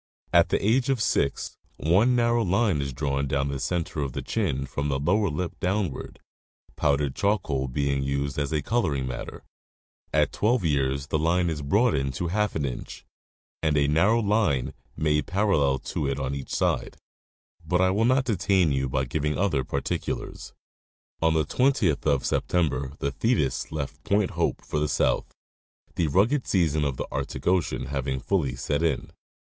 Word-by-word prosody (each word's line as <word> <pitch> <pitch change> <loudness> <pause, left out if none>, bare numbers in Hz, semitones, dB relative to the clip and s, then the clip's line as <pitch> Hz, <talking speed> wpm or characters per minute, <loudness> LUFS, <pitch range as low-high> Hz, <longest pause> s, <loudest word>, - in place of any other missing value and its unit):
At - - +5
the 100 - +1
age 125 +4 +2
of 135 -3 +2
six 70 -9 0 0.2
one 100 +11 +3
narrow 120 -1 +2
line 95 -4 +2
is 70 -1 -3
drawn 70 +1 -1
down 70 +1 0
the 70 -1 -3
center 85 -1 -2
of 70 -3 -3
the - - -4
chin 70 +1 -1
from 70 +2 -3
the 70 - 0
lower 100 +8 +1
lip 85 +3 -4
down 95 -2 0
ward, - - -9 0.6
powdered 70 -2 +1
charcoal 80 -10 0
being 70 +1 0
used 70 +1 -2
as 70 +1 -1
coloring 75 - 0
matter. 65 -1 -6 0.7
At - - +2
twelve 110 -2 +1
years 70 -2 0
the 75 +2 -1
line 85 +2 +2
is 75 -2 -4
broadened 70 - +1
to 85 +5 -2
half 105 +3 0
an 75 - 0
inch, 65 -3 -6 0.6
and 75 -2 +1
a 70 -1 +3
narrow 95 +10 +3
line 100 - +1 0.2
made 75 -2 +1
parallel 90 -9 +2 0.2
to 70 - -1
it 70 0 -1
on 65 0 -2
each 70 -1 -6
side. - - -1 0.7
But 90 - 0
I 95 0 +4
will 105 +4 +1
not 130 +2 +3
detain 95 - +2
you 65 -1 0
by 65 +1 0
giving 75 +4 -1
other 85 -9 +1
particulars. - - -4 0.7
On 80 0 +3
the 80 -2 +2
20th 105 - +1
of 70 -3 +2
September 70 -6 0
the 70 - -2
Thetis 65 - 0
left 75 -3 -5
Point 100 -1 +1
Hope - - -1
for 75 - -2
the 75 0 0
south, - - +1 0.6
the 85 - 0
rugged 110 - +2
season 80 -5 +2
of 70 -3 -2
the - - -3
Arctic 70 0 -4
ocean 90 -2 +1
having 70 -1 -2
fully 70 -7 0
set 70 +4 -1
in. 85 -1 -1
75 Hz, 170 wpm, -26 LUFS, 70-100 Hz, 0.7 s, At